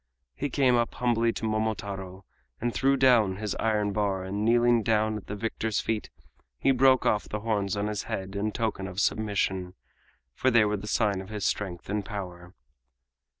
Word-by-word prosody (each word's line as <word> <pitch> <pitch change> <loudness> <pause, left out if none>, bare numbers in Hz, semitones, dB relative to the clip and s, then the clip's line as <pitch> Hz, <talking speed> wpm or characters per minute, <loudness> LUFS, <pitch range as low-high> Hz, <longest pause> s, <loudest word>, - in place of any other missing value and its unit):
He 145 - -3
came 130 -1 +3
up 120 -1 0
humbly 115 -1 +2
to - - -4
Momotaro 100 -4 -3 0.3
and 120 0 -1
threw 135 +1 +2
down 120 -7 +4
his 105 +1 -3
iron 105 -2 +1
bar, 100 -2 0
and 100 +2 -3
kneeling 120 +1 +4
down 110 0 +1
at 105 - -7
the 100 - -4
victor's 110 0 -2
feet 110 -1 -2 0.5
he 135 - +3
broke 130 0 +4
off 105 - +1
the 105 - -4
horns 105 -2 -1
on 100 - -1
his 105 -2 -2
head 95 +1 -4
in 105 +2 -1
token 105 -4 -2
of 95 0 -5
submission, 95 -3 0 0.6
for 130 - +1
they 115 -3 +5
were 105 0 0
the 105 +2 -8
sign 105 -4 +1
of 95 - -11
his 105 -2 -4
strength 90 -4 -2
and 105 +1 -1
power. 90 -3 -7
105 Hz, 185 wpm, -27 LUFS, 100-115 Hz, 0.6 s, they